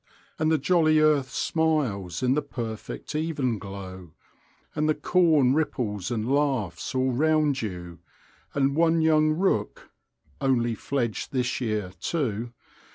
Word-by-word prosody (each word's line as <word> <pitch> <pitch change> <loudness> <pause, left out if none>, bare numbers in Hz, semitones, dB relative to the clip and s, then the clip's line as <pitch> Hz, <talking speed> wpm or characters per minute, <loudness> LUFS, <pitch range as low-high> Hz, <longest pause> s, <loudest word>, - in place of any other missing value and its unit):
And 155 0 +2
the 160 - +4
jolly 155 +1 +3
earth 150 -3 +3
smiles 130 - -1
in 125 0 +3
the 150 - +1
perfect 120 -5 -6
evenglow, 105 - -3 0.6
and 155 +1 0
the 155 - +3
corn 160 -8 +3
ripples 120 - -1
and 115 -2 -2
laughs 135 -7 -1
all 130 0 +2
round 150 +1 +2
you, 90 -5 -6 0.6
and 140 0 +2
one 165 0 +3
young 155 -1 +4
rook 155 - -1 0.5
(only 120 -3 +2
fledged 120 0 -3
this 125 -1 -1
year, 105 -6 -2
too!) 120 - -2
130 Hz, 125 wpm, -26 LUFS, 110-155 Hz, 0.6 s, the